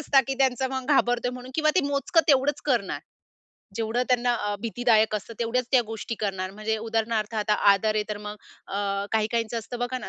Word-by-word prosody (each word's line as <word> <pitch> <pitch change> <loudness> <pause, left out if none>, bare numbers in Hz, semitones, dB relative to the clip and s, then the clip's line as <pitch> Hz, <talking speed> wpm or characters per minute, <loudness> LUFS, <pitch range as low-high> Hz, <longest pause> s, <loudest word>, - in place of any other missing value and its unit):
असतात, 280 -2 +4
की 270 - -1
त्यांचं 265 -1 +2
मग 260 -1 -3
घाबरतोय 245 0 +1
म्हणून 250 0 -9
किंवा 310 0 +3
ते - - +6
मोजकं 285 +5 +2
तेवढंच 280 +1 +3
करणार. - - 0 0.8
जेवढं 225 +2 0
त्यांना 245 -1 +2
अ, 205 -3 -2
भीतीदायक 225 -1 +2
असतं 215 +2 -5
तेवढ्याच 240 +2 0
त्या 255 - +6
गोष्टी 225 +1 -5
करणार 190 -3 -2
म्हणजे 215 +2 -2
उदाहरणार्थ 225 0 -1
आता 210 -1 +1 0.2
आदर 215 +2 +2
आहे 215 - +1
तर 210 - -3
मग 210 0 -7 0.3
अ, - - -7 0.4
काही 220 -1 +2
काहींचं 230 0 -1
असतं 240 +2 -7
बघा 245 +1 -2
ना - - -8
235 Hz, 195 wpm, -26 LUFS, 215-255 Hz, 0.8 s, ते